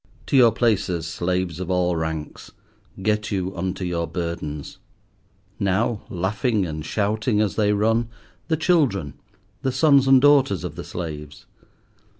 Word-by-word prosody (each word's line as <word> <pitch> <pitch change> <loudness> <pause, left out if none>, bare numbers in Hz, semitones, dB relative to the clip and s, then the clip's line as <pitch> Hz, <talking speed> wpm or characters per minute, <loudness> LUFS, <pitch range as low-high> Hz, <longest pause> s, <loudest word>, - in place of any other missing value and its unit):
To - - -1
your 120 -3 +7
places, 100 -8 0
slaves 90 0 -2
of 95 -1 -5
all 90 -1 +1
ranks. 80 -2 -5 0.5
Get 105 0 0
you 95 -1 -2
unto 90 +1 -3
your 85 -2 -2
burdens. 85 -4 -5 0.8
Now, 105 +3 0
laughing 105 +3 0
and 75 -2 -5
shouting 105 +4 0
as 105 -2 0
they 105 -2 +2
run, 115 +3 +1 0.4
the 160 -1 +1
children, 140 - +1 0.5
the 135 -2 0
sons 140 0 +4
and 135 -1 +7
daughters 135 - +4
of - - -4
the - - -6
slaves. 75 -4 -7
100 Hz, 140 wpm, -23 LUFS, 85-115 Hz, 0.8 s, your